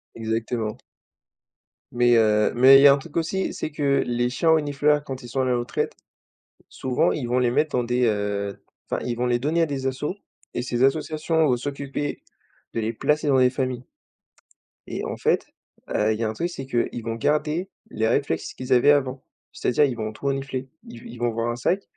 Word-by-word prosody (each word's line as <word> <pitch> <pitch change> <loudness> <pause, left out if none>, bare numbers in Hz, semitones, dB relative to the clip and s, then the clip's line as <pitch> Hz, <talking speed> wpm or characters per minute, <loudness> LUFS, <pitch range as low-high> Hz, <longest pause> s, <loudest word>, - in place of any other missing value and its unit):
Exactement. 115 -1 -2 1.1
Mais 120 0 +3
heu, 105 -1 +3
mais 130 +3 +8
il - - +5
y 145 - +9
a 140 - +8
un - - +1
truc 145 +3 -8
aussi, 170 +4 -1
c'est 155 - -4
que 140 -2 +1
les 120 0 0
chiens 145 +6 0
renifleurs 150 -1 +2
quand 135 -2 -6
ils 120 - -9
sont 135 +3 -1
à - - +1
la 125 -1 +1
retraite, 120 0 -2 0.7
souvent 130 -1 0
ils 130 -5 -3
vont 125 +1 +1
les 125 -1 +2
mettre 150 +3 +1
dans 125 - +1
des, 125 +1 +1
heu, 100 -2 -1 0.3
enfin - - -1
ils 120 - -2
vont 125 +1 -1
les 120 0 +1
donner 155 +6 +1
à - - +4
des 140 -3 -4
assos 130 +7 -3 0.4
et - - -2
ces 125 -1 -1
associations 155 +3 +1
vont 125 -3 +2
s'occuper 140 +2 -4 0.5
de - - -1
les 110 +1 -2
placer 150 +6 0
dans 135 -2 +4
des 125 0 +5
familles 130 -1 -3 1.0
et - - -4
en - - -4
fait, - - +1 0.4
heu, 110 +1 +1
il 110 - -5
y - - -1
a 110 - 0
un - - -3
truc, 170 +10 -2
c'est 135 -6 -7
qu'ils 120 -2 -2
vont 115 0 -3
garder 150 +8 0 0.2
les 110 - -1
réflexes 140 +5 -1
qu'ils 130 0 -2
avaient 125 +3 +6
avant, 135 -2 0 0.3
c'est-à-dire 135 +4 +2
ils 130 -3 -2
vont 110 -1 -4
tout 110 +6 -12
renifler. 135 -1 -2 0.2
Ils 120 - -10
v - - -11
ils 120 - -10
vont 120 0 +1
voir 115 +1 -2
un - - -3
sac, 180 +11 0
130 Hz, 215 wpm, -24 LUFS, 120-145 Hz, 1.1 s, y